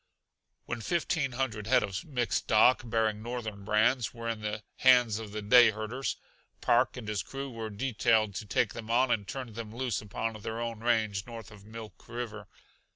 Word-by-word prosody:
When 120 -1 -4
fifteen 155 -2 0
hundred 115 -5 -2
head 125 +1 +4
of 100 -1 -3
mixed 125 -6 -1
stock, 115 +4 +5
bearing 110 -2 0
Northern 110 -4 -5
brands, 110 +2 +2
were 115 0 -6
in 115 -2 -2
the 105 0 -3
hands 125 -4 +5
of 110 -2 -7
the 105 0 -5
day 120 +3 +7
herders, 110 +5 -3 0.4
Park - - +2
and 115 -4 -7
his 105 -3 -1
crew 135 +7 -6
were 115 -2 -5
detailed 110 -1 +1
to 105 - -6
take - - +1
them 115 -1 -8
on 125 +2 +3
and 100 -3 0
turn 130 -4 -6
them 110 -1 -6
loose 120 -2 -2
upon 110 +2 -3
their 110 +2 -4
own 115 -1 -3
range 110 -4 0
north 115 -4 -9
of 100 -1 -14
Milk 110 0 -10
River. 115 -4 -5
115 Hz, 185 wpm, -30 LUFS, 105-120 Hz, 0.4 s, day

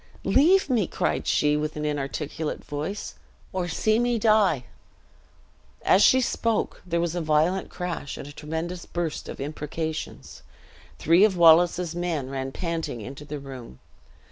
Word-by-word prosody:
"Leave 365 +8 +4
me," 235 - +1
cried - - -1
she, 150 0 +3
in 150 +1 0
an 150 0 -3
inarticulate 150 +1 -3
voice, 155 +8 -4 0.4
"or 185 -2 -1
see 215 +6 +1
me 240 0 +1
die." 210 - +3 1.2
As 190 - +5
she 260 - +6
spoke, 230 -3 -1
there 170 -2 -1
was 170 -1 -1
a 175 - -2
violent 160 +4 +1
crash, 175 -6 -5
and - - -8
a - - -9
tremendous 160 +4 -5
burst 170 -3 -3
of - - -7
imprecations. 155 +2 -5 0.6
Three 170 +5 +4
of 205 -4 +3
Wallace's 170 +1 +5
men 165 -7 -2
ran 135 0 -3
panting 165 -6 -3
into 135 +6 -8
the 150 0 -5
room. 130 - -10
165 Hz, 145 wpm, -25 LUFS, 150-185 Hz, 1.2 s, she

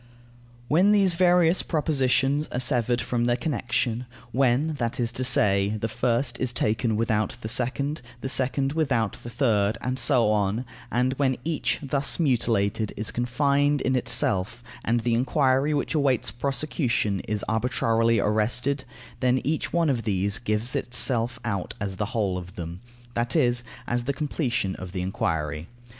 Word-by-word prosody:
When 185 +9 +4
these 195 -3 +4
various 175 0 +4
propositions 140 -2 +1
are 125 - -3
severed 120 -2 +1
from 120 -1 -1
their 120 0 +2
connection; 125 -3 -1 0.2
when, 135 +5 +2
that 120 0 -2
is 120 -1 0
to 130 - -3
say, 100 -3 +2
the 115 - -1
first 120 +2 -1
is 130 -2 +1
taken 110 -1 0
without 110 -1 0
the 110 - -4
second, 140 +6 0 0.2
the - - -3
second 135 +1 +1
without 135 -9 0
the 120 - -8
third, 110 -4 +1
and 130 +2 -2
so 120 -3 +3
on, 105 +3 0 0.3
and 125 +2 +1
when 130 -3 +1
each, 160 -2 -1
thus 140 +3 -1
mutilated, 115 -7 +1
is 105 - -3
confined 140 +4 +1
in 130 - +1
itself 115 -2 0 0.2
and 120 +1 +1
the 120 +1 0
enquiry 130 +3 +2
which 145 -1 -1
awaits 140 -6 +1
prosecution 120 - -1
is 105 -1 -2
arbitrarily 115 0 +1
arrested, 120 +7 0 0.3
then 130 0 +2
each 155 +2 -1
one 170 -1 +2
of 130 -5 +1
these 100 -1 0
gives 115 +1 -1
itself 120 -1 0
out 100 -5 -3
as 95 -1 -4
the 105 - -1
whole 95 -4 0
of 90 +1 -11
them, 85 +1 -7 0.3
that 120 +4 -1
is, 120 -5 +2 0.2
as 120 0 -1
the 140 - 0
completion 130 - -1
of 95 -1 -8
the 90 - -2
enquiry. 80 -4 -2
120 Hz, 155 wpm, -25 LUFS, 110-135 Hz, 0.3 s, When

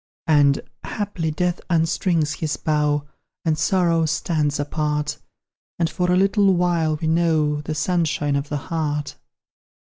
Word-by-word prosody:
And, 145 -4 +4 0.2
haply, 200 -6 -3
Death 175 +3 -1
unstrings 165 -2 +1
his 155 -3 -2
bow, 150 -1 0 0.4
And 160 -1 +2
Sorrow 165 0 +2
stands 155 -2 0
apart, 150 0 -2 0.6
And, 165 -1 0
for 180 -1 0
a - - +4
little 195 0 +3
while, 170 -3 +1
we 160 - -2
know 160 -3 +2
The 155 +1 -4
sunshine 150 -3 0
of 140 +1 -2
the 150 - -1 0.2
heart. 150 -3 -2
160 Hz, 130 wpm, -22 LUFS, 150-170 Hz, 0.6 s, And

